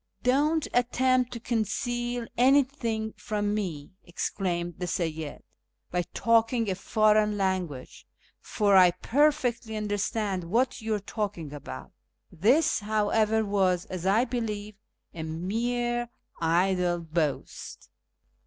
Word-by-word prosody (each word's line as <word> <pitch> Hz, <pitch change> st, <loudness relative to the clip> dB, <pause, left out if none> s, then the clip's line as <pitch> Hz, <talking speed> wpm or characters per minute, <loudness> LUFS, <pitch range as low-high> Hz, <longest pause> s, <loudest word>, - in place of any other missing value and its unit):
" -, -, -39 dB
Don't 295 Hz, +5 st, +2 dB
attempt 250 Hz, +1 st, +2 dB
to 235 Hz, -, -5 dB
conceal 240 Hz, +1 st, -2 dB
anything 250 Hz, -4 st, +2 dB
from 205 Hz, -1 st, -2 dB
me," 175 Hz, -9 st, -4 dB
exclaimed 175 Hz, -1 st, -3 dB
the 180 Hz, -, -3 dB
Seyyid, 160 Hz, -4 st, -3 dB, 0.2 s
" -, -, -49 dB
by 180 Hz, -, +1 dB
talking 230 Hz, -1 st, +2 dB
a -, -, +1 dB
foreign 210 Hz, +2 st, +2 dB
language, 185 Hz, -9 st, -3 dB, 0.3 s
for 205 Hz, -2 st, +1 dB
I 185 Hz, -1 st, +8 dB
perfectly 245 Hz, -, +1 dB
understand 205 Hz, -2 st, -2 dB
what 245 Hz, +9 st, 0 dB
you 220 Hz, 0 st, -1 dB
are -, -, -2 dB
talking 195 Hz, -7 st, -4 dB
about," 65 Hz, -, -8 dB, 0.4 s
This, 245 Hz, -, +3 dB
however, 215 Hz, +1 st, +1 dB
was, 190 Hz, -3 st, +1 dB
as 185 Hz, 0 st, -3 dB
I 220 Hz, +6 st, +4 dB
believe, 215 Hz, -4 st, -4 dB, 0.4 s
a 165 Hz, -, -6 dB
mere 240 Hz, +9 st, -2 dB, 0.3 s
idle 175 Hz, +1 st, +1 dB
boast. 160 Hz, -3 st, -3 dB
210 Hz, 115 wpm, -27 LUFS, 180-240 Hz, 0.4 s, I